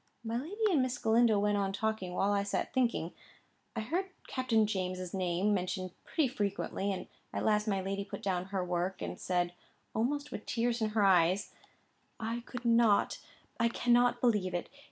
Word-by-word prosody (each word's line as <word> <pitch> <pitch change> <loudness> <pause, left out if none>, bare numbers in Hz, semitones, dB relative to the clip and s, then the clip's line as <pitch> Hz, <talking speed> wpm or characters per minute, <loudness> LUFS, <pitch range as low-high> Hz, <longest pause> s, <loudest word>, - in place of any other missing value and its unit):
My 230 0 -2
lady 405 - 0
and 300 -7 +4
Miss 255 -1 -1
Galindo 225 -1 +4
went 205 0 +2
on 195 -1 0
talking, 200 -3 -2
while 195 +2 +2
I 200 -1 +2
sat 200 0 -2
thinking. 235 -10 +1 0.6
I - - -1
heard 345 - -1 0.2
Captain 235 -4 +2
James's 185 -3 -3
name 185 +2 +1
mentioned 185 -1 -2
pretty 310 -4 +1
frequently; 200 -3 -2
and 190 - -4 0.3
at - - -2
last 210 0 +2
my 195 -2 +1
lady 195 +1 -2
put 200 - -8
down 185 -2 0
her 190 -1 -2
work, 180 +1 -2
and - - -5
said, 175 -1 0 0.4
almost 285 +6 -1
with 210 - -7
tears 235 0 0
in 215 - +2
her 210 - +5
eyes: 185 +1 +3 0.7
"I 230 +1 -2
could 245 -1 -7
not—I 230 0 +2
cannot 245 +1 +3
believe 210 -7 +2
it. 175 - -3
210 Hz, 175 wpm, -32 LUFS, 190-240 Hz, 0.7 s, her